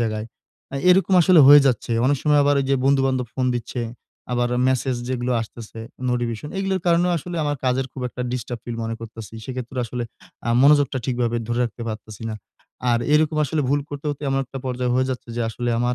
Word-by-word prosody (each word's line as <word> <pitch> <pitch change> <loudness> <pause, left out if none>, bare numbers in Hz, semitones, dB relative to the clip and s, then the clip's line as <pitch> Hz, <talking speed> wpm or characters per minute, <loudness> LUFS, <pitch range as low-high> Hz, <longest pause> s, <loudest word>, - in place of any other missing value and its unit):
জায়গায়। 110 -1 -2 0.5
আ - - -5 0.2
এরকম 190 +1 +4
আসলে 175 -1 +6
হয়ে 145 0 +10
যাচ্ছে। 120 -2 0
অনেক 145 +2 +3
সময় 150 -1 +4
আবার 145 0 +3
যে 135 - +4
বন্ধু-বান্ধব 135 -2 +2
ফোন 130 -1 0
দিচ্ছে, 120 +1 -4 0.5
আবার 120 0 +1 0.2
মেসেজ 130 0 0
যেগুলো 125 -1 -1
আসতেছে 115 0 -9 0.3
নোটিফিকেশন 120 +1 -2
এগুলোর 195 -1 -1
কারণে 170 +1 +4
আসলে 175 +2 -5
আমার 145 0 -1
কাজের 130 +1 +1
খুব 130 - -7
একটা 125 - -6
ডিস্টার্ব 120 -1 -4
ফিল 120 -1 -5
মনে 115 0 -3
করতেছি। 115 -1 -9
সেক্ষেত্রে 130 0 -6
আসলে 120 +1 -4 0.4
আ - - -1
মনোযোগটা 145 -2 +4
ঠিকভাবে 120 -2 0
ধরে 120 +1 0
রাখতে 120 0 -6
পারতেছি 110 -1 -7
না। - - -4 0.6
আর 120 - +3 0.2
এরকম 155 0 +3
আসলে 150 +2 -1
ভুল 145 +2 +2
করতে, 145 0 -7
করতে 145 0 -4
এমন 135 - +1
একটা 135 +1 -8
পর্যায় 125 -1 -1
হয়ে 130 +1 +2
যাচ্ছে, 125 -2 -5
যে - - -1
আসলে 120 +1 -3
আমার 120 +1 +1
125 Hz, 195 wpm, -22 LUFS, 120-145 Hz, 0.6 s, হয়ে